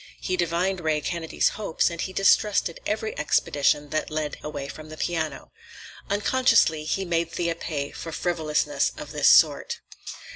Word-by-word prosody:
He 185 - -2
divined 180 +2 0
Ray 155 -2 +1
Kennedy's 165 +2 0
hopes, 200 -5 -1
and 170 - -5
he 190 - -3
distrusted 195 -2 +2
every 215 +1 -2
expedition 145 -1 +1
that 155 - -1
led 155 -1 -3
away 145 -2 -5
from 155 +2 -10
the 155 - -9
piano. 160 -2 -3 0.6
Unconsciously 205 -7 +3
he 190 +5 -1
made 170 -1 0
Thea 170 0 -1
pay 145 -4 -4
for 165 - -7
frivolousness 170 - 0
of - - -8
this - - +4
sort. 475 -1 +4
170 Hz, 150 wpm, -25 LUFS, 155-190 Hz, 0.6 s, this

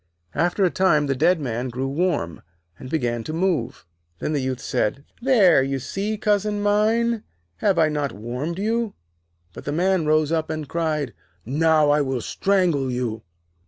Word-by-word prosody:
After 175 +3 +1
a 180 - +2
time 165 -6 +3
the 135 -1 0
dead 165 +6 +3
man 125 -2 -3
grew 130 +3 -3
warm, 145 - -1 0.4
and 130 - -8
began 120 -6 -1
to 155 - -4
move. 165 -8 -1 0.3
Then 150 - -2
the 145 - 0
Youth 130 -1 -2
said: 135 +7 -1 0.2
'There, 215 - +5
you 135 +1 -1
see, 200 - -3
cousin 210 0 +1
mine, 220 +3 +2 0.4
have 195 -4 +1
I 160 -1 +5
not 150 -2 -1
warmed 125 - -4
you?' 225 +2 -1 0.6
But - - -10
the 145 - -2
Man 180 +1 +1
rose 155 0 +3
up, 160 -1 0
and 155 -2 -4
cried: 155 -6 -1 0.3
'Now, 155 +3 +3
I 150 0 +3
will 130 -3 -1
strangle 175 - +1
you!' 120 -3 -2
155 Hz, 165 wpm, -23 LUFS, 135-190 Hz, 0.6 s, There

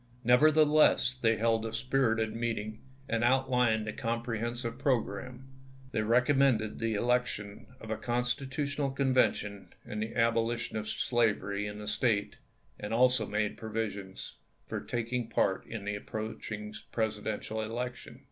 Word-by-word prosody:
Nevertheless, 150 +2 +5
they 115 -3 +1
held 115 0 +2
a 115 - -3
spirited 115 -3 +1
meeting, 110 -2 -3 0.3
and 115 -2 0
outlined 125 -3 +2
a 110 - -3
comprehensive 115 +1 -2
progi'amme. 125 -1 -1 0.5
They 110 - 0
recommended 125 -1 +3
the 115 -1 0
election 105 -3 -1
of 110 - -8
a 110 - -1
Constitutional 135 +4 -1
Convention 130 -7 +1 0.2
and 105 0 -4
the 110 +1 -4
abolition 115 0 +1
of 110 0 -3
slavery 105 -4 0
in 105 0 -6
the 105 0 -8
State, 105 -1 0 0.4
and 105 +2 -3
also 125 -2 +4
made 105 0 -1
provision 105 -3 -4 0.5
for - - -4
taking 120 0 -2
part 95 -4 +1
in 110 -3 -6
the 105 - -1
approaching 110 0 -5 0.2
Presidential 110 0 -2
election. 120 +2 -5
115 Hz, 130 wpm, -31 LUFS, 110-125 Hz, 0.5 s, Nevertheless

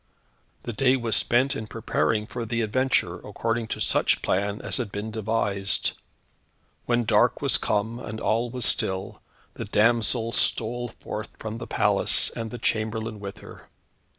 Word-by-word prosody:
The 120 - -4
day 130 +3 +3
was 115 -3 0
spent 130 +3 +3
in 110 - -5
preparing 110 0 0
for 120 +2 -5
the 115 +1 -1
adventure, 110 -5 +1
according 115 +2 -2
to - - -4
such - - +2
plan 100 +2 0
as - - -1
had 120 -6 -3
been 105 +2 -4
devised. 105 -2 0 1.0
When 120 0 +2
dark - - +3
was - - +3
come, 110 +3 -1
and 110 -3 -6
all 115 +3 +1
was 125 -1 -3
still, 95 +1 0 0.3
the - - -6
damsel 115 +1 +2
stole 120 +1 0
forth 110 -1 -7
from 110 +1 -6
the - - -7
palace, - - +3
and 115 -1 -5
the 120 - -6
chamberlain 110 -1 -1
with 100 -1 -8
her. - - -13
110 Hz, 155 wpm, -25 LUFS, 105-120 Hz, 1.0 s, day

